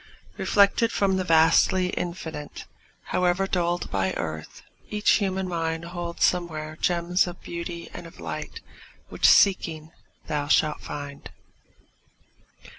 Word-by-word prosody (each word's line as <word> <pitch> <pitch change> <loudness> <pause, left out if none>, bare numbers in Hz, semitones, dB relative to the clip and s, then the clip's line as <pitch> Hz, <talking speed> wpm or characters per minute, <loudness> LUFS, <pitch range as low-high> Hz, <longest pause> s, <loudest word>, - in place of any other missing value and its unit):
Reflected 205 +3 +3
from 195 -1 +1
the 185 - 0
vastly 170 +2 +4
Infinite, 165 -5 -5 0.5
However 180 +1 +2
dulled 175 -2 -1
by 95 -1 0
earth, 80 -1 -6 0.3
each 210 0 +2
human 190 -2 -1
mind 165 -1 -2
Holds 170 -1 -4
somewhere 155 -3 0
gems 175 +1 +1
of 175 0 -7
beauty 170 0 -6
and 175 -1 -8
of 165 - -16
light 80 -2 -6 0.5
Which, 65 - +2
seeking, 160 - +3 0.3
thou 150 -2 -2
shalt 150 0 +2
find. 145 -1 -7
170 Hz, 115 wpm, -25 LUFS, 155-180 Hz, 0.5 s, vastly